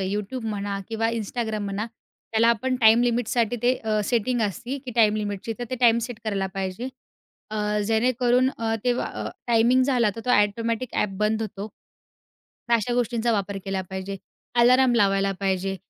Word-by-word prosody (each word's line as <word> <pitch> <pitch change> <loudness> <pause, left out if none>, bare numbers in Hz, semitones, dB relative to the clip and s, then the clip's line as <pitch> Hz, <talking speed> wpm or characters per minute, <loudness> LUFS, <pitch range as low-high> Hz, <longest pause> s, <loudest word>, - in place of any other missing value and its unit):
YouTube 210 +5 -3
म्हणा, 200 -1 -3
किंवा 225 0 0
Instagram 220 0 -3
म्हणा, 200 +3 -3 0.5
त्याला 225 +1 +4
आपण 255 +3 +1
टाईम 225 +2 +6
लिमिटसाठी 240 -1 +1
ते 250 +1 +4
अ, 215 -1 +1
सेटिंग 240 +1 0
असतं 245 +7 -3
की 250 - -5
टाईम 215 -2 +4
लिमिटची, 205 +1 -3
तर 245 - -3
ते - - -1
टाईम 235 -1 +5
सेट 245 -3 -8
करायला 195 -3 -1
पाहिजे. 195 +6 -3 0.6
अ, 210 0 -1
जेणेकरून 245 +2 +2
अ, 225 -1 0
तेव्हा 245 0 +1 0.2
अ, - - -3 0.2
टायमिंग 240 +2 +4
झाला, 245 -5 +2
तर - - -5
तो 250 - 0
ॲटोमॅटिक 230 +3 +1
ॲप 210 - +1
बंद 215 +1 +1
होतो, 205 -1 -5 1.0
तर - - +4
अशा 230 +1 +1
गोष्टींचा 240 -1 0
वापर 200 -1 -1
केला 195 -1 -2
पाहिजे. 190 +1 -5 0.4
अलार्म 250 +1 +5
लावायला 195 -2 +3
पाहिजे. 195 0 -1
225 Hz, 165 wpm, -24 LUFS, 205-240 Hz, 1.0 s, टाईम